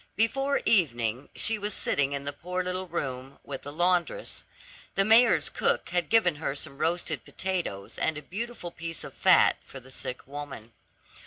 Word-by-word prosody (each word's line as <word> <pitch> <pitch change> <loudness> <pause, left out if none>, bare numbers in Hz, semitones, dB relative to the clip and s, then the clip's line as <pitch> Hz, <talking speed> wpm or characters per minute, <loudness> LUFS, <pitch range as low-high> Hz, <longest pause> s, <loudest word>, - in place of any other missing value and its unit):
Before 270 +6 +1
evening, 125 - +2
she 220 -1 +2
was 205 0 -2
sitting 140 0 +1
in 140 0 -4
the 145 - -2
poor 180 +5 -3
little 185 +1 -2
room 135 -5 -4
with 135 -2 -6
the 145 - -8
laundress. 175 - 0 0.5
The 195 - +4
mayor's 225 -8 +6
cook - - 0
had 175 0 0
given 185 -9 +4
her 145 -2 -2
some 140 -1 -4
roasted 170 +2 0
potatoes 175 - -4
and 160 - +1
a 150 - -7
beautiful 210 0 -5
piece 165 -1 -5
of - - -9
fat - - +5
for 135 - -11
the 130 +1 -15
sick 125 -1 -5
woman. 140 -5 -8
165 Hz, 170 wpm, -28 LUFS, 140-190 Hz, 0.5 s, mayor's